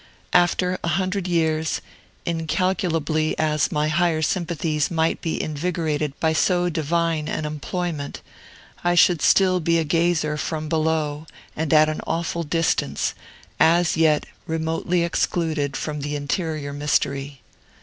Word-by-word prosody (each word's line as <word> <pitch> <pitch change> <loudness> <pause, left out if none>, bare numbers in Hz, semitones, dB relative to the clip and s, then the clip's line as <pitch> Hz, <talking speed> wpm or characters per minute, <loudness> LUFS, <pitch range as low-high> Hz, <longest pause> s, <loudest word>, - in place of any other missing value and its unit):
After 180 +1 +3
a - - -1
hundred 185 +2 0
years, 160 -2 +1 0.5
incalculably 165 -2 0
as 155 -1 +1
my 150 0 +1
higher 160 0 +1
sympathies 160 -3 0
might 160 -1 0
be 165 - -2
invigorated 155 -2 -2
by 160 -1 +2
so 175 +2 +2
divine 165 -1 0
an 155 - -2
employment, 150 0 -4 0.6
I 175 0 +2
should 175 -2 +5
still 185 -2 +4
be 170 0 +2
a 165 - +2
gazer 160 -1 +1
from 155 +1 -3
below 155 -1 -1 0.3
and 160 0 -2
at 155 -1 +6
an 155 - -3
awful 170 +1 -1
distance, 165 +1 0 0.5
as 170 +1 +4
yet 160 -2 +3 0.2
remotely 165 +2 0
excluded 160 -4 -1
from 150 0 -4
the 145 +1 -3
interior 145 0 -2
mystery. 140 -1 -1
160 Hz, 130 wpm, -23 LUFS, 150-170 Hz, 0.6 s, at